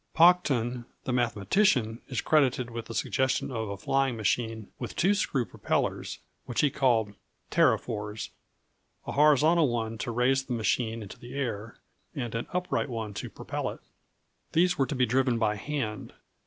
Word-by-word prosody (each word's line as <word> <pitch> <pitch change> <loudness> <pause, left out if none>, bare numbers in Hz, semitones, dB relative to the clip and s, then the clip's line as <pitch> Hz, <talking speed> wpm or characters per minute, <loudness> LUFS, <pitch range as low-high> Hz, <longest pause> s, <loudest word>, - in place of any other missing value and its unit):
Paucton, 135 -9 +4 0.2
the 130 - -2
mathematician, 115 - +2
is 130 - -2
credited 130 -5 +2
with 115 0 -5
the 115 - -7
suggestion 130 +1 0
of 110 -4 -3
a 100 - -4
flying 135 +3 +1
machine 110 0 -1
with - - -5
two 190 +4 +3
screw 140 -11 0
propellers, - - -2 0.3
which 120 - 0
he 145 -2 +3
called 115 -7 +2 0.4
"pterophores" 105 0 +1 0.8
a - - -4
horizontal 150 +2 +5
one 115 -1 -2
to 120 - -3
raise 130 +3 +2
the 130 - -3
machine 115 0 0
into 100 - -10
the 120 +3 -10
air, 115 -5 -3 0.4
and 120 -4 -3
an 115 +1 -3
upright 180 -5 -1
one 110 -3 -4
to - - -5
propel - - -4
it. - - -8 0.7
These 180 +2 +4
were 135 - +1
to 150 - -3
be 125 -1 +3
driven 125 0 +2
by 110 -2 +1
hand. 115 -3 -4
120 Hz, 160 wpm, -28 LUFS, 110-135 Hz, 0.8 s, horizontal